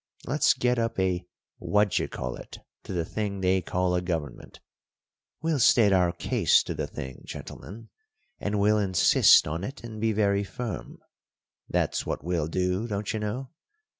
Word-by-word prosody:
Let's 140 +3 +3
get 125 -1 +1
up 115 -2 -1
a 95 -1 0 0.3
what 105 -1 +2
d'you - - 0
call - - -5
it - - -10 0.3
to - - -7
the 85 -3 -1
thing 100 +1 -3
they 95 0 +2
call 90 +1 -1
a 90 - +1
government. 80 -7 -5 0.8
We'll 160 -3 +1
state 110 -4 +5
our 90 -2 +3
case - - +2
to - - -4
the - - -3
thing, 65 -2 -8
gentlemen; 115 +4 -9 0.5
and 100 0 -1
we'll 105 +1 +3
insist 95 -3 +5
on 80 +4 -3
it 135 +5 -7
and 110 -2 -8
be 110 0 +2
very 100 -1 +1
firm; 110 0 -6 0.7
that's - - 0
what - - -4
we'll 85 -3 -1
do, 90 +6 -1
don't 105 -2 -3
you 110 - -2
know. 115 +5 -4
100 Hz, 165 wpm, -27 LUFS, 90-110 Hz, 0.8 s, state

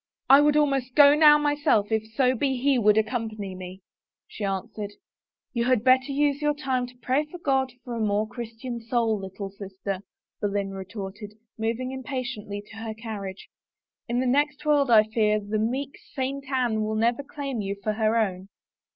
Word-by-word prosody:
" - - -53
I 285 - +7
would 295 0 +4
almost 275 -4 +1
go 285 -1 +8
now 300 0 +7
myself 290 -8 +1
if 220 0 +1
so 255 0 +3
be 265 +1 0
he 265 0 +2
would 210 -1 +4
accompany 220 -3 -2
me," 185 +1 -9 0.5
she 215 - -8
answered. 200 +1 -3 0.3
" - - -65
You 235 -1 0
had 250 -3 +2
better 260 +2 +4
use 285 +1 +1
your 295 0 +1
time 260 -4 -1
to 250 0 -16
pray 265 +4 +2 0.2
God 265 -2 +1
for 245 - -6
a 230 - -3
more 210 0 +1
Christian 235 +1 -6
soul, 230 -2 0
little 195 +1 -7
sister," 195 -1 -5 0.4
Boleyn 200 -1 -1
retorted, 195 +2 -7 0.2
moving 230 +3 -2
im 265 0 -5
patiently 245 -7 -5
to 215 - -11
her 225 -1 -5
carriage. 205 -4 -7 0.3
" - - -66
In 240 +1 +1
the 260 - 0
next 290 +3 +1
world, 290 -3 +3
I 220 -2 +7
fear, 215 -1 +1
the 210 +1 -2
meek 265 +6 -2 0.2
Saint 270 0 -3
Anne 245 -5 +1
will 215 0 -1
never 235 +4 +1
claim 275 -4 -5
you 200 0 -3
for 215 - 0
her 220 +1 +1
own." 190 -4 -1
235 Hz, 185 wpm, -26 LUFS, 210-265 Hz, 0.5 s, go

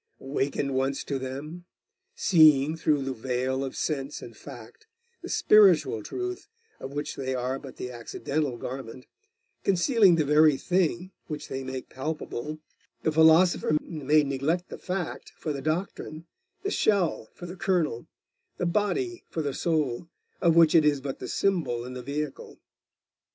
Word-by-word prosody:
Awakened 140 0 -2
once 135 +1 0
to 140 -2 -3
them; 145 +7 -7 0.5
seeing, 155 -4 +5
through 150 -3 +1
the 135 0 -2
veil 130 +2 -2
of 135 - -5
sense 140 -2 -2
and - - -10
fact, 435 - -12 0.3
the - - -8
spiritual 175 - +5
truth 370 - -5 0.3
of 135 - -7
which 145 +1 -4
they 130 -1 -3
are 130 +2 -2
but 135 -3 -11
the 125 - -6
accidental 125 +3 -3
garment, 130 0 -7 0.6
concealing 195 - +4
the 155 -2 +1
very 150 0 +5
thing 180 +1 0 0.2
which 150 -2 -6
they 135 0 -4
make 130 0 -6
palpable, 150 0 -5 0.5
the 155 - +2
philosopher 160 0 +5
may 150 -1 +1
neglect 145 +6 -1
the - - -8
fact 180 -2 -4
for 155 - -3
the 140 - -5
doctrine, 155 0 -3 0.4
the 400 - -1
shell 185 - +1
for 175 - -9
the 175 +1 -7
kernel, 175 -10 0 0.5
the - - -1
body 345 - -1
for 160 - -3
the 140 -2 -2
soul, 155 -3 -1 0.3
of 165 -1 +4
which 165 -2 +6
it 165 - +6
is 150 -2 +3
but 135 0 -5
the - - -6
symbol 140 -12 0
and 125 0 -7
the 125 - -5
vehicle. 140 +2 -5
150 Hz, 155 wpm, -27 LUFS, 135-170 Hz, 0.6 s, which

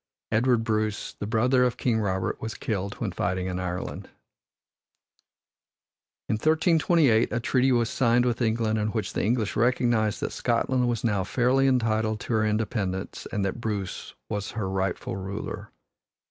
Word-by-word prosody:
Edward 115 +1 +3
Bruce, 110 -1 -1
the 105 - -6
brother 125 +4 +3
of 125 -1 +1
King 115 -4 +1
Robert, 95 -3 -1
was 110 0 -4
killed 100 -2 -3
when 105 -5 -3
fighting 90 +1 -1
in 90 0 -3
Ireland. 90 -1 -4 2.2
In 110 - 0
1328 160 -4 +3
a 115 - 0
treaty 130 +2 +2
was 120 -2 +3
signed 120 -1 +3
with 120 0 0
England 110 -1 +1
in 105 - 0
which 110 -2 -3
the - - -1
English 110 -1 0
recognized 120 -2 +2
that - - -2
Scotland 125 +1 +1
was 115 -3 -2
now 105 -5 +1
fairly 130 +6 +2
entitled 110 -4 +1
to - - -3
her 110 -1 +2
independence 105 -3 -2
and 100 -3 -1
that 100 +5 -3
Bruce 105 -5 -4
was 105 -2 -3
her 100 -3 -1
rightful 95 -1 -2
ruler. 95 +2 -5
110 Hz, 155 wpm, -26 LUFS, 105-120 Hz, 2.2 s, Edward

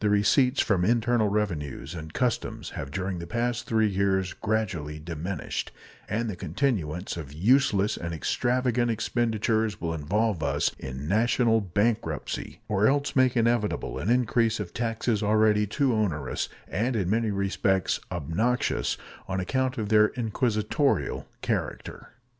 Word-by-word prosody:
The 105 - +2
receipts 125 +7 +3
from 95 -4 +1
internal 120 +1 +2
revenues 85 - -2
and 80 -2 -7
customs 120 +4 -2
have 70 - -5
during 95 +3 -3
the 85 - -6
past 120 +3 -1
three 110 -1 +3
years 95 -2 +1
gradually 95 -9 -2
diminished, 80 +2 -4 0.4
and 115 +3 -1
the 105 - -3
continuance 90 - -2
of 75 -5 -7
useless 105 - +3
and 85 0 -4
extravagant 120 - 0
expenditures 110 -1 0
will 80 -1 -2
involve 95 +5 0
us 75 - +1
in 65 +2 -6
national 115 +3 +3
bankruptcy, 100 -4 -2
or 105 +1 +3
else 140 +1 +1
make 130 -2 +4
inevitable 115 -2 +1
an - - -2
increase 115 -2 +2
of 95 -5 -5
taxes 115 -1 -1
already 105 0 +3
too 135 +4 +1
onerous 85 - -1 0.2
and 115 - -1
in 95 -5 0
many 110 +3 +1
respects 95 -1 +1
obnoxious 90 - 0 0.3
on 95 0 -2
account 130 +7 -1
of 105 -3 -2
their 105 -1 +6
inquisitorial 115 +3 0 0.2
character. - - -3
105 Hz, 135 wpm, -27 LUFS, 90-120 Hz, 0.4 s, their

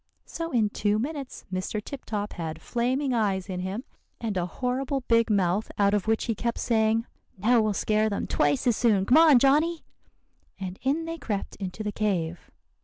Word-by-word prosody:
So 330 0 -5
in 220 -5 +2
two 205 0 +1
minutes 275 +3 -5
Mr. 185 +3 -2
Tip 265 +6 -8
Top 210 -1 -3
had 160 -2 -5
flaming 255 - -1
eyes 200 -5 0
in 185 -2 -4
him, 190 +6 -4 0.4
and 220 -4 -3
a 180 -1 0
horrible 260 - -2
big 230 -2 +2
mouth, 195 0 +1
out 200 0 +3
of 205 -1 0
which 225 0 +1
he 230 - 0
kept 235 +2 -2
saying, 225 0 +1 0.3
'Now 225 +4 +4
we'll 215 -1 +1
scare 215 +2 +1
them 200 - -2
twice 145 -2 +1
as 240 -3 +3
soon. 210 -5 +2
Come 255 - +5
on, 315 -5 +7
Johnny!' 305 +6 +3 0.8
And 190 -1 -6
in 290 +6 0
they 330 0 -5
crept 205 -8 -3
into 195 +2 -5
the 210 - -2
cave. 175 -6 -2
220 Hz, 185 wpm, -26 LUFS, 195-250 Hz, 0.8 s, on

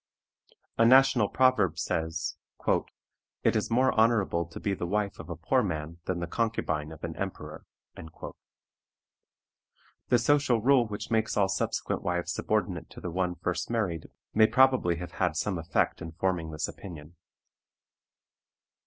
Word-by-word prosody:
A - - +6
national 130 -3 +5
proverb 110 -11 +3
says, 80 +1 -2 1.1
"It - - +3
is - - 0
more 130 +3 +3
honorable 105 -7 +2
to 85 - -9
be 100 - -1
the 90 -2 -3
wife 100 +1 -1
of - - -9
a - - -4
poor - - +1
man 80 +2 -4
than 90 -1 -2
the 85 - -2
concubine 85 -7 -2
of 80 - -12
an - - -4
emperor." - - -6 2.4
The 125 - +4
social 130 0 +3
rule 125 0 +4
which 105 +2 -6
makes 110 -1 +1
all 100 -2 +3
subsequent 95 - -1
wives 90 0 -1
subordinate 100 -5 -1
to - - -11
the 90 - -5
one 90 0 -1
first 90 +1 -3
married 100 -9 -1 0.3
may 110 0 +6
probably 130 -7 +4
have 85 +1 -7
had - - -1
some 95 -4 -1
effect 80 +1 0
in 80 0 -7
forming 90 -2 -1
this 75 -1 -3
opinion. 80 -3 -10
95 Hz, 145 wpm, -28 LUFS, 85-115 Hz, 2.4 s, A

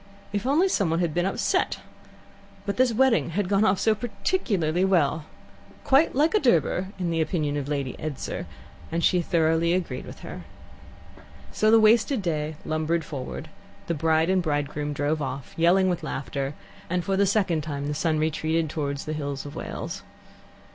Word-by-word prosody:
If 205 +4 -1
only 315 +8 +4
someone 180 - +1
had 170 -3 0
been 175 +3 +1
upset! 195 - 0 0.9
But 200 - -2
this 255 -1 +4
wedding 240 -4 +3
had 205 -3 +1
gone 200 +2 +3
off 195 -2 +3
so 220 - +3
particularly 200 - -1
well 160 -5 +2 0.6
"quite 275 +2 +4
like 305 +7 +3
a 425 - +4
Durbar" 185 - +2
in 180 -3 -1
the 165 -1 +1
opinion 155 -2 -1
of 145 -2 -3
Lady 140 -3 -2
Edser, 155 -3 -4 0.4
and 165 +1 -1
she 180 - +4
thoroughly 165 0 +2
agreed 170 -9 -2
with - - -10
her. - - -7 1.1
So 215 - +2
the 225 +1 +7
wasted 220 +2 +4
day 155 -2 -2
lumbered 155 +1 0
forward, 145 +2 -6 0.3
the 170 - -1
bride 160 +2 +2
and 190 -1 +3
bridegroom 145 -2 -2
drove 145 +2 -1
off, 135 -1 -5
yelling 180 +3 +4
with 180 -2 0
laughter, 135 +2 -4 0.3
and 180 0 0
for 195 - +1
the 200 +1 +3
second 185 -6 +1
time 145 -2 -4
the 145 - -2
sun 155 +1 0
retreated 155 0 0
towards 140 -2 -3
the 155 - -3
hills 145 -2 -4
of 145 - -8
Wales. - - -5
165 Hz, 170 wpm, -25 LUFS, 150-195 Hz, 1.1 s, the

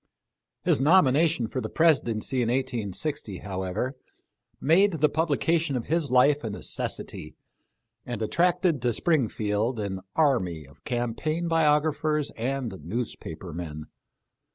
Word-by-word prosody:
His - - +2
nomination 150 -4 +4
for 130 - -3
the - - -4
Presidency 130 -6 +2
in 115 - 0
i860, 125 - -2
however, 95 +6 -3 0.6
made 185 +7 +4
the 155 -2 +2
publication 160 0 +1
of 120 - -2
his 160 -3 0
life 140 +4 +4
a 110 - -2
neces 100 - -2
sity, 75 - -10 0.7
and 120 -3 -4
attracted 175 - +1
to 120 -1 +1
Springfield 115 -6 0
an 100 -2 -3 0.2
army 95 - +1
of 70 +1 -20
cam 120 -2 -1
paign 155 +7 -2
biographers 150 -1 +2
and 120 -4 -3
newspaper 90 -4 -5
men. 80 -3 -6
130 Hz, 125 wpm, -26 LUFS, 110-155 Hz, 0.7 s, nomination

